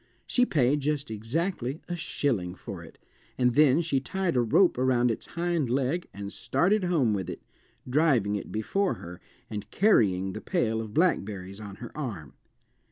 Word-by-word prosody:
She 250 0 +2
paid 145 -1 +2
just 145 -2 -2
exactly 130 - -2
a 175 - -3
shilling 120 - -1
for - - -8
it, - - -14 0.4
and 125 -1 +3
then 150 +2 +5
she 155 -5 0
tied 185 +4 -2
a 125 - +4
rope 125 - +3
around 125 -2 +3
its 115 - -6
hind 170 -5 -1
leg 140 +7 0
and 100 0 -7
started 185 +8 +1
home 150 -11 +2
with 95 -3 -3
it, - - -7 0.4
driving 125 -7 +2
it 100 - -5
before 185 - 0
her, 90 +1 -10 0.3
and 105 -1 -6
carrying 95 - +3
the - - -6
pail 115 - 0
of 110 -2 -8
blackberries 100 - 0
on 100 -2 -8
her 120 +2 -10
arm. 110 - -5
130 Hz, 165 wpm, -28 LUFS, 105-165 Hz, 0.4 s, then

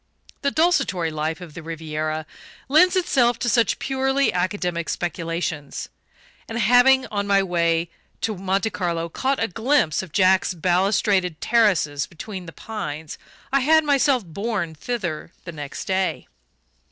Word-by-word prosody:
The 280 - +2
desultory 275 - +1
life 155 +2 -3
of 170 -4 -10
the 165 - -8
Riviera 155 -1 -4 0.4
lends 335 +7 +5
itself 245 -10 +2
to 245 - -3
such 235 -2 +2
purely 270 -1 +1
academic 180 -2 -1
speculations; 165 -3 -3 0.6
and 225 - -4
having, 245 +4 +5
on 200 -1 -2
my 200 -1 +4
way 170 -2 +1 0.3
to 220 - -1
Monte 195 +3 -1
Carlo, 170 -2 -2
caught 265 +10 -1
a 225 - +1
glimpse 225 - +1
of 190 -4 -10
Jack's 190 +1 +3
balustraded 185 0 +1
terraces 180 -11 +2
between 185 +1 -8
the - - -7
pines, 160 -8 -6 0.3
I 275 - +5
had 315 +4 +4
myself 275 -5 +2
borne 195 -1 -3
thither 175 -3 -4
the 170 - -6
next 145 -3 -7
day. 190 0 -1
190 Hz, 140 wpm, -23 LUFS, 165-240 Hz, 0.6 s, lends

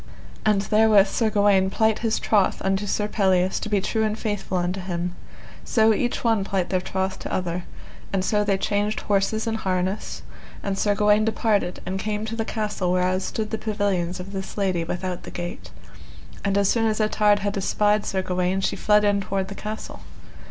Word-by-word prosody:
And 205 -2 +3
therewith 210 -1 +5
Sir 225 -2 +1
Gawaine 200 -2 +3
plight 220 +2 +1
his 225 -1 0
troth 205 -3 +2
unto 195 +1 0
Sir 210 +1 0
Pelleas 190 -3 +2
to 215 - -5
be 205 -1 +2
true 220 +3 -1
and 215 0 0
faithful 205 -4 -2
unto 180 +2 -1
him; 175 -1 -3 0.5
so 220 -1 +3
each 240 +3 -1
one 225 -4 +2
plight 190 -2 -2
their 185 -1 +1
troth 190 +1 -2
to - - -6
other, 180 -1 -2 0.5
and 190 -1 0
so 210 0 +2
they 200 -2 +1
changed 205 +2 -1
horses 205 +2 0
and 225 -1 -1
harness, 190 -1 -2 0.4
and 200 -1 -1
Sir 205 -1 +2
Gawaine 210 0 +4
departed, 215 -4 0
and 190 +1 -3
came 210 +1 -2
to 220 +1 -4
the 225 - -1
castle 210 -5 -2
whereas 185 +1 +1
stood 215 -1 -3
the 220 - -2
pavilions 195 -5 -1
of 185 +2 -7
this 190 0 -6
lady 185 -4 0
without 180 +1 -4
the - - -9
gate. 175 0 -6 0.7
And 200 0 +1
as 200 -1 +3
soon 225 +2 +2
as 215 0 0
Ettard 210 -1 +3
had 205 0 -1
espied 210 +2 +2
Sir 190 -1 -1
Gawaine 180 +1 0
she - - 0
fled 210 0 +3
in 205 -1 +2
toward 195 0 -2
the - - -5
castle. 215 +2 -6
200 Hz, 195 wpm, -24 LUFS, 190-215 Hz, 0.7 s, therewith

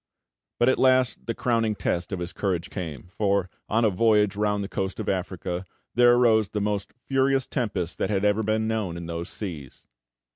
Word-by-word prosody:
But 120 - +3
at 130 - +3
last 130 -1 +3
the 115 - -1
crowning 115 -3 +1
test 90 -1 -2
of 95 - -2
his 90 0 -5
courage 90 -3 -2
came; 85 -3 -6
for, 100 -3 +1 0.2
on 115 +2 +3
a 105 - +3
voyage 105 0 +3
round 105 -1 0
the - - -4
coast 95 -1 -3
of - - -4
Africa, 90 -1 -2 0.3
there 120 0 +6
arose 110 -4 +4
the 105 - -2
most 100 -1 -2 0.2
furious 135 0 +2
tempest 100 - -2
that - - 0
had 100 -1 +1
ever 105 +1 +3
been 110 +1 0
known 105 -6 -2
in 85 - -6
those 85 +1 -5
seas. 80 - -7
105 Hz, 190 wpm, -25 LUFS, 90-115 Hz, 0.3 s, there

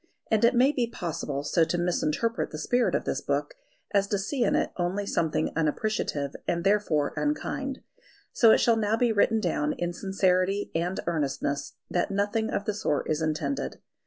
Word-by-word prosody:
And 220 0 +3
it 235 +2 +5
may 260 +4 +5
be 245 -5 -1
possible 165 -8 -4
so 165 +3 +2
to 175 - 0
misinterpret 180 +6 0
the 155 - -7
spirit 245 +9 +1
of - - -1
this - - -1
book - - -1 0.4
as 200 -1 +3
to 205 - 0
see 240 +7 -1
in 205 - +2
it - - +1
only 185 +3 -1
something 160 -4 0
unappreciative 155 -3 -1
and 170 0 0
therefore 195 -7 +2
unkind. 280 -2 -2 0.5
So 230 - +5
it - - +7
shall 230 -1 +3
now 220 0 +1
be 240 -1 +2
written 220 +1 +3
down 155 -6 0
in 175 0 -3
sincerity 190 +1 +1
and 175 +3 -1
earnestness 145 -3 -2 0.2
that 175 - +1
nothing 205 +3 0
of 200 - -2
the 210 - 0
sort 155 -9 -1
is 155 +1 0
intended. 150 -3 -2
190 Hz, 180 wpm, -27 LUFS, 160-220 Hz, 0.5 s, it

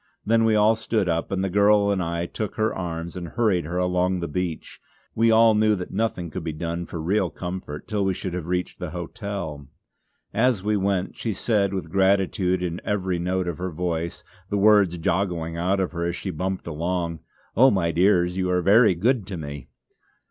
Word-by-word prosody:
Then 115 +1 +3
we 110 -1 +3
all 105 +1 +5
stood 110 -3 -1
up, 85 -1 -1
and 95 -1 0
the - - +1
girl 100 +1 +4
and 95 -2 0
I 85 0 -2
took 105 +3 -5
her 110 0 0
arms 85 -2 -5
and 90 -2 -5
hurried 105 -5 +1
her 85 +3 -3
along 90 0 +1
the 85 - -3
beach; 85 +1 -4 0.3
we 115 +1 +3
all 115 0 +6
knew 105 0 +3
that 90 -2 -6
nothing 95 -5 -2
could 95 - -5
be 80 -1 -3
done 85 +2 -4
for 85 - -6
real 95 +3 +1
comfort 90 -2 -6
till 105 -2 -1
we 95 -1 0
should 90 -1 -5
have 90 -2 -4
reached 90 0 -2
the 90 -2 -4
hotel. 85 -4 -6 0.7
As 115 -3 +2
we 105 +1 +1
went 95 -2 -1
she 115 - -3
said 100 -2 +1
with 95 -2 -4
gratitude 95 -1 +2
in 85 0 -3
every 95 -3 -1
note 90 +1 -1
of 85 -1 -4
her 95 +1 -2
voice, 85 0 -3 0.3
the 100 - 0
words 100 -4 +4
joggling 85 -2 -1
out 90 +4 0
of 95 - -1
her 85 -1 -3
as 85 0 -1
she 95 - -4
bumped 95 +3 -3
along: 85 +1 -2 0.4
"Oh, 130 +5 +7
my 90 -7 +1
dears, 90 0 +3
you 90 -1 0
are 90 -1 +1
very 105 0 +5
good 110 +3 +1
to 95 -3 -5
me." 70 -4 -7
90 Hz, 205 wpm, -24 LUFS, 85-100 Hz, 0.7 s, Oh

